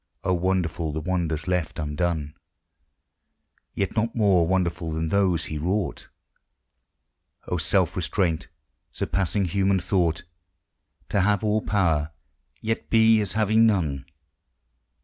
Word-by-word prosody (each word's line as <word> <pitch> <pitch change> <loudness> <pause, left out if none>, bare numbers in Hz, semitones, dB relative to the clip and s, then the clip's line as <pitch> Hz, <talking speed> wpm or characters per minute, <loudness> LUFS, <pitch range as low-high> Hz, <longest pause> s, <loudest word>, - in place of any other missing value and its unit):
Oh, 95 - +1
wonderful 85 -3 -1
the 75 - -3
wonders 85 -2 -2
left 90 -3 -1
undone! 75 0 -2 1.4
Yet 95 -2 -2
not 115 +1 0
more 95 -7 +3
wonderful 85 -2 -1
than 80 0 -2
those 90 -5 +1
He 75 - -5
wrought! 95 +5 -2 1.4
Oh, 90 - -1
self 90 +2 +1
restraint, 85 -1 -1 0.4
surpassing 95 +1 -1
human 95 +2 +1
thought! 85 -4 0 0.9
To 100 - +2
have 100 +1 +2
all 110 0 +1
power, 80 -8 +1 0.5
yet 115 0 -3
be 110 -1 +5
as 100 -3 -3
having 110 +1 +4
none 75 -10 0
90 Hz, 115 wpm, -25 LUFS, 80-100 Hz, 1.4 s, be